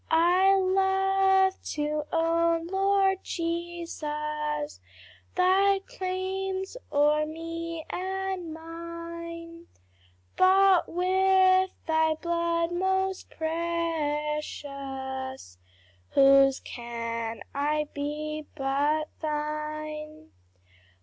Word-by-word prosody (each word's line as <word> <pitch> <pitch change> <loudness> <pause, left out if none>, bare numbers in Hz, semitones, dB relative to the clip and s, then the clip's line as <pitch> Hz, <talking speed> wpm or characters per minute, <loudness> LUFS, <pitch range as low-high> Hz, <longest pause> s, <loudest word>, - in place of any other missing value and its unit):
I 360 +4 +5
love 385 0 +3
to 300 0 -1
own, 330 0 +2
Lord 385 +1 +2
Jesus, 300 -3 -3 0.6
Thy 390 +2 +4
claims 380 -2 -3 0.2
o'er 300 +1 +3
me 330 +1 -5
and 380 -2 -3
mine, 335 +1 -8 0.7
Bought 380 0 +5
with 375 +1 +4 0.2
thy 320 0 +2
blood 335 +1 0
most 380 +1 0
precious, 295 - -3 0.6
Whose 275 0 +6
can 230 -1 -5
I 300 +2 0
be 300 +1 -4
but 290 +2 +1
thine! 305 0 -4
330 Hz, 70 wpm, -27 LUFS, 300-370 Hz, 0.7 s, Whose